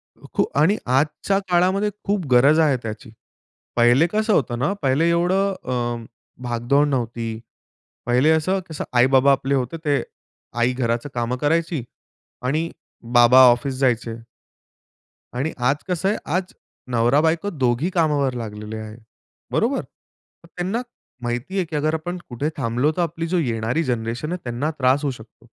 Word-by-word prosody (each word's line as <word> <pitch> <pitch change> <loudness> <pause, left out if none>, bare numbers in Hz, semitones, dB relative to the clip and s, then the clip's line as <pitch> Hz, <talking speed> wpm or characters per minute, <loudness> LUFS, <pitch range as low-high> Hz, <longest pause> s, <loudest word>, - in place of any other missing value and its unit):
अ, - - -18
खूप - - -1
आणि 170 +9 +4
आजच्या 150 +9 +1
काळामध्ये 185 +4 +2
खूप 200 -3 -1
गरज 140 +6 +5
आहे 150 -5 +3
त्याची. 110 +1 -7 0.7
पहिले 120 +7 +5
कसं 215 +1 +1
होतं 120 - +1
ना 140 +10 +1
पहिले 140 +5 +2
एवढं 185 +4 +2
अ, 120 -2 -2 0.4
भागदौड 120 +4 +1
नव्हती. 115 -4 -3 0.7
पहिले 125 +5 +3
असं 185 +5 +1
कसं 160 - -4
आई-बाबा 130 +3 +5
आपले 135 0 +1
होते, 130 +4 -2
ते 150 -3 0 0.6
आई 120 +2 +2
घराचं 120 +1 -1
कामं 120 +1 -2
करायची 160 -1 0 0.6
आणि 155 +6 0 0.4
बाबा 120 +1 +7
ऑफिस 125 +3 -1
जायचे. 120 -3 +1 1.2
आणि 140 +6 -1
आज 125 +3 +2
कसं 180 +1 -1
आहे, 210 - 0
आज 180 +4 -2 0.4
नवरा-बायको 150 - +2
दोघी 135 -1 0
कामावर 150 -6 +1
लागलेले 110 -2 -6
आहेत. 110 +1 -8 0.5
बरोबर? - - +1 0.6
मग - - -16
त्यांना 190 +7 -2 0.4
माहिती 120 +10 -3
आहे, 185 - +1
की 160 - -7
अगर 155 +2 0
आपण 175 +3 -3
कुठे 135 +5 -2
थांबलो 125 +3 +1
तर - - +2
आपली 165 0 -2
जो 180 +2 0
येणारी 120 +1 -1
जनरेशन 120 +3 -3
आहे 180 -1 -4
त्यांना 125 +6 -2
त्रास 130 +2 +3
होऊ 140 - 0
शकतो. 115 -1 -14
140 Hz, 150 wpm, -22 LUFS, 120-165 Hz, 1.2 s, बाबा